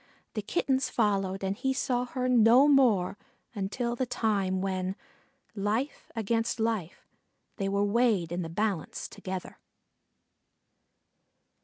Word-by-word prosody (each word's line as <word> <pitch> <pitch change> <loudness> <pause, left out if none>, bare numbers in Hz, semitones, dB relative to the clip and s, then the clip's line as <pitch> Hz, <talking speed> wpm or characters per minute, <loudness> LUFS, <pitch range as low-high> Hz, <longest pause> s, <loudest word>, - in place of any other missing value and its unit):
The 215 - -2
Kittens 265 +3 0
followed, 195 -3 0
and 195 +1 -1
he 265 +4 0
saw 250 -2 0
her 255 0 -2
no 245 +2 +6
more 230 -10 +3 0.3
until 235 +4 -2
the 255 +1 -1
time 200 -5 0
when, 185 0 -2 0.6
life 220 +7 -2
against 225 +1 0
life, 220 -7 -2 0.5
they 195 -3 -1
were 200 +1 +1
weighed 205 -6 +2
in 175 +1 -2
the 165 - -4
balance 195 -1 -2
together. 185 -1 -7
215 Hz, 120 wpm, -29 LUFS, 195-245 Hz, 0.6 s, no